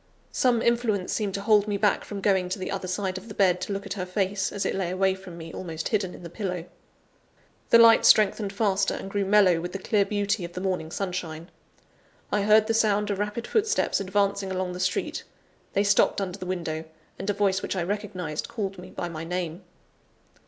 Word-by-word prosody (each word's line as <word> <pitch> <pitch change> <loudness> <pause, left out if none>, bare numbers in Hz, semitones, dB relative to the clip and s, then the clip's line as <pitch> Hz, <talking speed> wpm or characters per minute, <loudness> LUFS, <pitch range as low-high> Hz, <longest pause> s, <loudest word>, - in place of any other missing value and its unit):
Some 245 -3 +2
influence 230 -5 +1
seemed 205 -3 -1
to 200 - -3
hold 210 0 +4
me 205 -1 0
back 205 0 +2
from 200 -1 -6
going 190 -3 +2
to 185 - -2
the 185 - -4
other 190 -1 -3
side 185 0 -2
of 195 - -15
the 210 - -9
bed, 180 -3 +3
to - - -4
look 200 0 -3
at - - -4
her 185 -3 -4
face, 195 +1 -1
as 200 -1 -3
it - - 0
lay 190 -3 -1
away 190 +1 +2
from 190 -2 -10
me, 165 -1 -9
almost 165 -3 -4
hidden 195 -5 -1
in - - -12
the - - -6
pillow. 180 -4 -4 1.0
The - - +8
light 230 -1 +7
strengthened 210 -1 +4
faster, 200 -1 +1
and 195 - -7
grew 200 -1 0
mellow 190 -4 +4
with 175 +1 -5
the - - -2
clear 200 +1 +2
beauty 205 -1 -1
of 170 0 -7
the 180 - -4
morning 180 -4 -2
sunshine. 175 -3 -4 0.8
I 205 - +2
heard 215 +1 +5
the 225 - 0
sound 210 -2 +2
of 200 - -2
rapid 210 +3 -2
footsteps 445 +1 +1
advancing 200 0 0
along 185 -1 -2
the 180 - -6
street; 185 0 -1 0.5
they 200 - +2
stopped 200 0 +3
under 195 0 -4
the 185 - -6
window: 165 -3 -3 0.3
and 195 - -4
a - - +2
voice 200 -1 +1
which - - -3
I 180 - 0
recognized, 185 -5 -3
called 195 -4 -4
me 180 +1 -10
by 175 - -4
my 165 -2 -6
name. 175 0 -4
195 Hz, 215 wpm, -26 LUFS, 180-205 Hz, 1.0 s, The